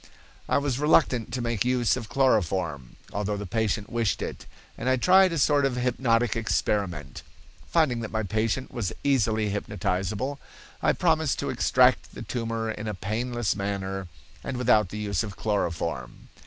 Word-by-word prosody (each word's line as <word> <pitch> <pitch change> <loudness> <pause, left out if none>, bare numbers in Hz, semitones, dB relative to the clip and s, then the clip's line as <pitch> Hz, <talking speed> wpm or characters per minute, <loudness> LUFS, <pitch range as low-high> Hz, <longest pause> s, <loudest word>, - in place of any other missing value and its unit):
"I - - +3
was 140 -3 -1
reluctant 140 -6 +3
to 125 -1 -2
make 115 -4 0
use 125 -2 +2
of 115 -4 -6
chloroform, 90 - 0 0.2
although 105 0 -1
the 105 - -5
patient 105 0 -1
wished 115 -3 0
it, - - -6 0.3
and 125 - -2
I 130 - +4
tried 185 +7 +5
a 165 - -2
short 145 0 +3
hypnotic 120 -2 +1
experiment. 95 - -1 0.5
Finding 155 -8 +2
that 110 -2 -4
my 110 0 -2
patient 110 +5 -1
was 120 -7 -2
easily 110 -6 +2
hypnotizable, 105 +6 -2 0.4
I - - +3
promised - - +1
to - - -2
extract - - +3
the - - -6
tumor 115 -2 -2
in 110 0 -6
a 105 - -3
painless 120 +4 -1
manner 95 -1 -3 0.4
and 130 - -4
without 110 -6 +3
the 105 - -6
use 100 -4 -1
of 105 -3 -6
chloroform. 85 - -2
110 Hz, 155 wpm, -26 LUFS, 100-125 Hz, 0.5 s, tried